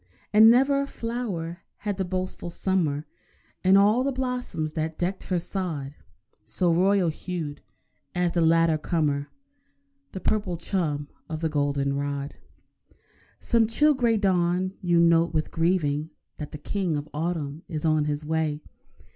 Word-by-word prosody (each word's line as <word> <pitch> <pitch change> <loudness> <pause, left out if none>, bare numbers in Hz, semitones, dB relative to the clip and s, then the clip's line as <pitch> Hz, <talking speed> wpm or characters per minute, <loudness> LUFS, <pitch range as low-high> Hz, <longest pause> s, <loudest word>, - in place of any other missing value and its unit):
And 220 +1 +9
never 270 +4 +4
a 280 - -3
flower 210 -10 -4 0.2
had 205 -2 -3
the 190 - 0
boastful 185 -1 -4
summer, 165 -5 0 0.6
In 190 +1 +6
all 210 +5 +4
the 275 - 0
blossoms 250 - -3
that 155 0 -3
decked 185 +2 -2
her 180 - 0
sod, 165 -6 -4 0.5
So 175 -2 +1
royal 185 +1 +3
hued 155 -3 -5 0.5
as 180 -1 +1
that 170 - +1
later 165 -1 +4
comer 150 -3 0 0.8
The 190 - -4
purple 195 -4 -1
chum 160 -5 -2 0.2
of 160 -1 -4
the 160 - 0
goldenrod. 140 -1 -1 1.1
Some 230 -2 +2
chill 295 +7 +4
grey 235 -4 +2
dawn 185 -2 +1
you 175 -2 +3
note 170 0 +4
with 155 - 0
grieving 160 -3 +1 0.3
That 150 - -6
the - - -6
King 175 0 -2
of 145 +1 -5
Autumn 155 -1 -3
is 160 -4 -4
on 155 -1 +3
his 150 0 -2
way. 155 -1 -1
170 Hz, 145 wpm, -26 LUFS, 155-195 Hz, 1.1 s, And